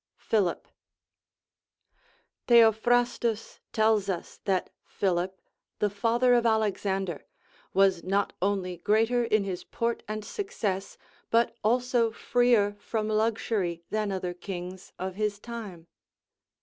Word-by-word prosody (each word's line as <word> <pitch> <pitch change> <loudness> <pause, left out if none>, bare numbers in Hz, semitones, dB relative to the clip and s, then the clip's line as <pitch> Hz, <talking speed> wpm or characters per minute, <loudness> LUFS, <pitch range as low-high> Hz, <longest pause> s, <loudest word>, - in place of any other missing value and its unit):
Philip. 200 -6 0 1.8
Theophrastus 235 0 +3
tells 215 -2 +2
us 180 -3 -4
that 190 -2 0
Philip, 185 0 -1 0.4
the 210 - +1
father 235 +5 +2
of 240 -1 +4
Alexander, 195 -6 0 0.5
was 190 -3 +4
not 200 +2 0
only 185 -2 -1
greater 225 +7 +2
in 215 -3 +2
his 185 -2 -4
port 235 0 -2
and 215 0 -4
success, 205 - -3 0.3
but 230 0 +2
also 245 +1 +2
freer 230 -3 +2
from 215 +1 -2
luxury 215 -5 0
than 215 -1 0
other 185 -2 -3
kings 180 0 -7
of 185 0 -4
his 210 +1 -2
lime. 210 -8 -7
210 Hz, 110 wpm, -28 LUFS, 190-230 Hz, 1.8 s, of